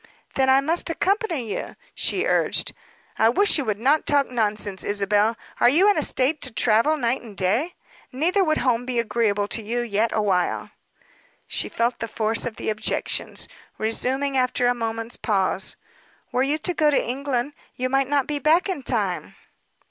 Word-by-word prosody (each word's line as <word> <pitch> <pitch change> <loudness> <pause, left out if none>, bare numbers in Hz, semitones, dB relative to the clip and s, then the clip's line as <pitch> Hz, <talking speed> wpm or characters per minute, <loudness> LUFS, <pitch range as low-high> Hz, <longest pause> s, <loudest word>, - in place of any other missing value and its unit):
"Then 265 -1 +2
I 265 +1 +5
must 330 +5 0
accompany 335 - -1
you," - - -5 0.2
she 385 +3 -1
urged. - - +1 0.5
"I 220 - +5
wish 400 - +3
you 280 - -2
would 215 -2 -1
not 275 +7 +2
talk 285 -1 +3
nonsense, 210 -4 -1
Isabel. 205 +2 +1 0.2
Are 240 - +6
you 340 +10 +5
in - - 0
a - - +1
state 280 +4 +2
to 255 - -3
travel 230 +7 +2
night 245 -1 0
and 220 -4 -12
day? 225 - 0 0.4
Neither 345 +9 +1
would 310 -3 +1
home 245 -2 +1
be 250 -1 -3
agreeable 215 -3 0
to 225 - -1
you 235 +3 -2
yet 225 -1 0
awhile." 195 -5 0 0.7
She - - -3
felt 235 +1 -1
the 230 - -3
force 220 +1 0
of 225 - -6
the - - -2
objections. 215 0 -2 0.3
Resuming 265 +5 -1
after 255 -1 +1
a 245 - +4
moment's 230 0 -4
pause 195 -3 0 0.6
"Were 250 - +1
you 280 +3 +2
to 355 +3 -2
go 310 -3 +3
to 290 - +1
England, 265 +1 -2 0.2
you 255 - -1
might 270 +1 +1
not 285 -2 +2
be 295 -1 -2
back 320 +7 +3
in 370 -7 -3
time." 195 - -2
245 Hz, 180 wpm, -23 LUFS, 220-290 Hz, 0.7 s, Are